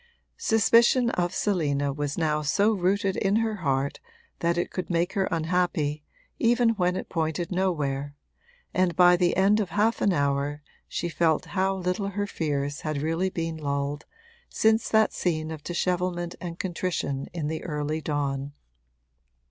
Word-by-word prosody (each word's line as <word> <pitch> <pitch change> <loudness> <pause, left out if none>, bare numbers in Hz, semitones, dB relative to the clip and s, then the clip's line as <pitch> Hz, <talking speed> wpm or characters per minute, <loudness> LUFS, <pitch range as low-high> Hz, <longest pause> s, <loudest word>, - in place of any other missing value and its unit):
Suspicion 235 - +4
of 175 -1 0
Selina 145 -8 0
was 145 0 -3
now 155 -2 +1
so 200 +9 +2
rooted 195 0 +1
in 195 +1 +1
her 220 -1 0
heart 140 -5 -1 0.4
that 170 0 +1
it 175 - -1
could 185 - -4
make 175 +1 0
her 195 -1 +1
unhappy 160 -3 0 0.4
even 240 0 +3
when 180 -5 +1
it - - -4
pointed 165 +1 -2
nowhere, 145 -7 -1 0.6
and 185 -2 +1
by 180 0 +7
the 175 -1 +1
end 200 +3 +4
of 200 -5 -1
half 215 +7 +1
an 200 - +3
hour 145 -1 0 0.2
she 175 - -3
felt 165 -2 +1
how 190 +1 +1
little 185 +2 -2
her 205 +1 -2
fears 145 -6 -2
had 155 -2 -2
really 165 +4 0
been 165 -2 -3
lulled 140 0 -3 0.4
since 220 +1 +2
that 220 -1 +3
scene 155 -3 -1
of 155 -2 -7
dishevelment 175 0 -1
and 170 -1 -6
contrition 170 -7 -2
in 170 -3 -4
the 160 +1 -3
early 150 0 -2
dawn. 140 -1 -2
175 Hz, 155 wpm, -26 LUFS, 150-190 Hz, 0.6 s, by